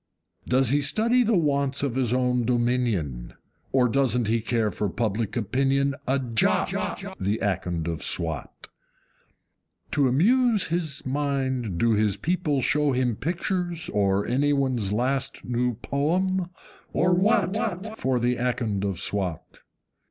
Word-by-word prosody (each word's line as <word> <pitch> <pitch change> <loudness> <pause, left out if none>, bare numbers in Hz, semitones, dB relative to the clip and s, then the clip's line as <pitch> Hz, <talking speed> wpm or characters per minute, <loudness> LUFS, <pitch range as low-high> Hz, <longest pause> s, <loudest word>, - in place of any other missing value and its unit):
Does 130 -1 +2
he 145 +3 +2
study 225 - +2
the 225 -4 +2
wants 140 -3 0
of 140 -4 0
his 125 -3 0
own 125 -1 +1
dominion? 120 - -1 0.4
Or 130 -2 +3
doesn't 125 -3 +1
he 115 0 +1
care 110 -2 0
for 100 +2 -2
public 110 +2 -2
opinion 135 +5 +1
a 135 +2 +2
JOT, 120 -4 +1 0.5
The 100 +3 0
Akond 90 -6 -2
of 85 -2 -3
Swat? 80 -4 -3 1.2
To 140 -2 +3
amuse 215 - +3
his 160 -4 -2
mind 130 -7 -1
do 115 +5 +2
his 105 -2 +1
people 165 -5 0
show 150 +2 +2
him 125 -2 0
Pictures, 175 - -2
or 100 0 +1
any 145 +4 +1
one's 130 -8 0
last 130 +5 -1
new 120 0 0
poem, 175 - -1 0.4
or 180 +2 +2
WHAT, 205 +1 0
For 130 - 0
the 120 +1 +1
Akond 115 -5 -1
of 100 -3 -2
Swat? 95 -4 -3
130 Hz, 135 wpm, -25 LUFS, 110-150 Hz, 1.2 s, Or